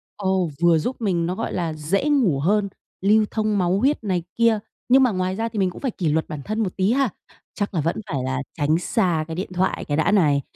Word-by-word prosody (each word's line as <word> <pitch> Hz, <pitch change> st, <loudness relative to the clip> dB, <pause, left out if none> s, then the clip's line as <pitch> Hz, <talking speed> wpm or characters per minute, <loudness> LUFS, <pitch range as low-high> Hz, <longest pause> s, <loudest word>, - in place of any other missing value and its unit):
Ồ, 190 Hz, -4 st, 0 dB
vừa 170 Hz, -1 st, +5 dB
giúp 245 Hz, +12 st, -2 dB
mình 180 Hz, -6 st, +1 dB
nó, 180 Hz, +2 st, -2 dB
gọi 230 Hz, -, -3 dB
là, 170 Hz, -3 st, -2 dB
dễ 170 Hz, -, -1 dB
ngủ 230 Hz, -, +3 dB
hơn, 200 Hz, +6 st, +1 dB, 0.4 s
lưu 215 Hz, +1 st, +5 dB
thông 215 Hz, -2 st, 0 dB
máu 185 Hz, +1 st, +1 dB
huyết 275 Hz, +2 st, +1 dB
này 185 Hz, -5 st, -1 dB
kia, 230 Hz, -2 st, +3 dB, 0.3 s
nhưng 265 Hz, +2 st, +6 dB
mà 250 Hz, -, +3 dB
ngoài 185 Hz, 0 st, -1 dB
ra 225 Hz, +2 st, -2 dB
thì 215 Hz, -2 st, -4 dB
mình 190 Hz, -1 st, +2 dB
cũng -, -, -10 dB
phải 265 Hz, -, -1 dB
kỷ 170 Hz, -6 st, -2 dB
luật 160 Hz, +2 st, 0 dB
bản 150 Hz, -2 st, -5 dB
thân 215 Hz, +1 st, -2 dB
một 185 Hz, -, -4 dB
tí 190 Hz, +3 st, +2 dB
ha? 265 Hz, -1 st, +2 dB, 0.4 s
Chắc 205 Hz, -1 st, -3 dB
là 160 Hz, -, 0 dB
vẫn 165 Hz, +3 st, 0 dB
phải 135 Hz, -4 st, -2 dB
là 130 Hz, 0 st, -2 dB, 0.2 s
tránh 155 Hz, +1 st, +2 dB
xa 175 Hz, -4 st, 0 dB
cái 160 Hz, -, -5 dB
điện 185 Hz, +2 st, -4 dB
thoại 185 Hz, +1 st, 0 dB
cái 145 Hz, 0 st, -1 dB
đã 160 Hz, +6 st, +2 dB
này, 150 Hz, -8 st, +3 dB
190 Hz, 250 wpm, -22 LUFS, 165-215 Hz, 0.4 s, nhưng